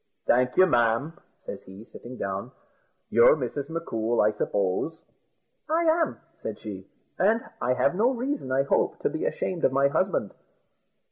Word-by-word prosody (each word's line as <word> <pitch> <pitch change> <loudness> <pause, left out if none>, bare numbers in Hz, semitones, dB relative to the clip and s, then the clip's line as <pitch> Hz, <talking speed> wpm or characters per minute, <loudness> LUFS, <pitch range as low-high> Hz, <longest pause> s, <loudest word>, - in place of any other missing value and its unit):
"Thank 125 +1 +2
you, 185 - +8
ma'am," 120 +1 +2 0.3
says - - -6
he, 95 +4 -12
sitting 125 +1 -11
down; 100 +5 -4 0.6
"you're - - +7
Mrs. 145 - -4
M'Coul, 120 -9 -2
I 105 - +4
suppose?" 105 - -1 0.7
"I 325 +2 +2
am," 325 0 +2 0.2
said - - -5
she; - - -8 0.3
"and 220 +4 +4 0.2
I 125 +1 +2
have 140 - +2
no 220 +7 +3
reason, 260 - -3
I 135 +1 +3
hope, 140 - +1
to 440 - 0
be 330 +6 -3
ashamed 185 - -2
of - - +4
my 140 +1 +3
husband." 185 - 0
140 Hz, 155 wpm, -26 LUFS, -, 0.7 s, you